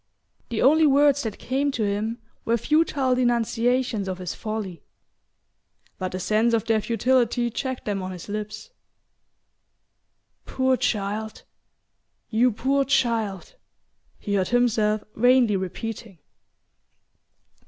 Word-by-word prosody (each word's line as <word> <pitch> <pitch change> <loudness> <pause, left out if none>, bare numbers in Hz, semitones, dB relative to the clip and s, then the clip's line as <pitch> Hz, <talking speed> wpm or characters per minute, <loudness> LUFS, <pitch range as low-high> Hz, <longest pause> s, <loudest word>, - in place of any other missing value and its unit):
The 230 - -1
only 310 +4 +5
words 285 0 +4
that 220 -3 -4
came 275 +3 -1
to 230 - -1
him 210 +3 -1 0.3
were 230 +1 +1
futile 290 -1 +1
denunciations 240 -2 +1
of 185 -1 -3
his 180 -2 -5
folly; 215 -6 -5 1.2
but 185 -1 -3
the 185 - -4
sense 220 +5 +2
of 225 - -1
their 225 -1 +2
futility 240 +2 +1
checked 260 +2 -4
them 200 -2 -2
on 185 - -5
his 180 -2 -8
lips. 210 - -6 1.8
"Poor 260 0 +1
child 215 -1 -2 0.9
you 240 +3 +3
poor 270 +5 +1
child!" 225 - 0 0.6
he 205 - -4
heard 190 -2 +1
himself 220 -3 +1
vainly 245 -2 +4
repeating. 195 +2 -5
230 Hz, 115 wpm, -24 LUFS, 210-255 Hz, 1.8 s, only